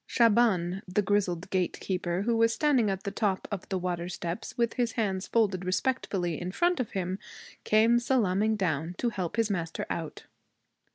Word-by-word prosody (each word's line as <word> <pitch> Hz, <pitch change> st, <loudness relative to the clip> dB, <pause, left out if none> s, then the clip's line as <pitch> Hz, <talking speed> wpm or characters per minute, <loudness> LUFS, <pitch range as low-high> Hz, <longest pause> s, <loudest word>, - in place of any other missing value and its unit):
Shaban, 205 Hz, -6 st, +3 dB
the 185 Hz, +3 st, +1 dB
grizzled 190 Hz, -3 st, 0 dB
gatekeeper, 180 Hz, 0 st, -1 dB
who 235 Hz, +2 st, +1 dB
was 230 Hz, 0 st, +4 dB
standing 260 Hz, -5 st, +2 dB
at 190 Hz, -1 st, -3 dB
the 200 Hz, -, -3 dB
top 200 Hz, -4 st, -1 dB
of 200 Hz, -3 st, -5 dB
the 190 Hz, -, 0 dB
water 175 Hz, -1 st, -3 dB
steps 170 Hz, 0 st, -5 dB
with 235 Hz, -1 st, +1 dB
his 240 Hz, -2 st, 0 dB
hands 195 Hz, -4 st, -1 dB
folded 195 Hz, -5 st, +1 dB
respectfully 185 Hz, -, -1 dB
in 180 Hz, +1 st, -3 dB
front 345 Hz, -, +1 dB
of 250 Hz, -, -1 dB
him, 185 Hz, 0 st, -2 dB, 0.5 s
came 225 Hz, +2 st, +4 dB
salaaming 220 Hz, -4 st, +2 dB
down 170 Hz, -3 st, -1 dB
to 240 Hz, -, 0 dB
help 190 Hz, -4 st, -4 dB
his 225 Hz, -1 st, +1 dB
master 170 Hz, -4 st, -3 dB
out. 165 Hz, -2 st, -5 dB
195 Hz, 170 wpm, -29 LUFS, 180-230 Hz, 0.5 s, was